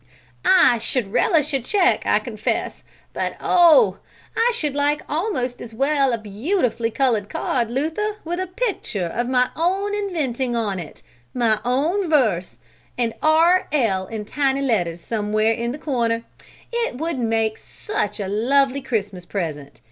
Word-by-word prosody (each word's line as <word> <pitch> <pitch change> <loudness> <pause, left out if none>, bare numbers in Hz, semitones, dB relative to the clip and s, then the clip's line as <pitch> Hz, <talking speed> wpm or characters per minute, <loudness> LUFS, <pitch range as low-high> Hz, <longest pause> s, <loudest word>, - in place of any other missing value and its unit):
"I 260 -11 +5
should 225 -3 -2
relish 300 +3 +2
a 270 - +2
check, 370 - +2
I - - +4
confess; - - -3 0.3
but - - -2
oh! 355 +6 +5 0.4
I 475 +2 +3
should 300 - -1
like 290 +1 0
almost 300 - -2
as 230 -2 -9
well 275 +1 +2
a 235 - 0
beautifully 230 - -1
colored 230 -5 0
card, 235 -3 -1
Luther, 320 - -1
with 350 +2 -3
a 370 - -2
picture 365 - -2
of 240 +8 -2
my 250 -1 +2
own 385 +5 0
inventing 280 - -2
on 205 -5 -1
it, 160 -4 -10 0.3
my 225 -4 +2
own 315 +10 0
verse, 215 - +1 0.4
and 235 -2 0
R. 330 +4 +4
L. 205 -10 +1
in 215 0 -5
tiny 275 +3 0
letters 175 -10 0
somewhere 215 0 0
in 235 +1 -2
the 275 - -5
corner! 235 -6 -1 0.5
It 470 - -1
would 320 -1 -2
make 225 -2 0
such 210 - -4
a 200 - -3
lovely 270 +6 +2
Christmas 200 -7 -3
present! 155 -7 -5
255 Hz, 150 wpm, -22 LUFS, 220-320 Hz, 0.5 s, I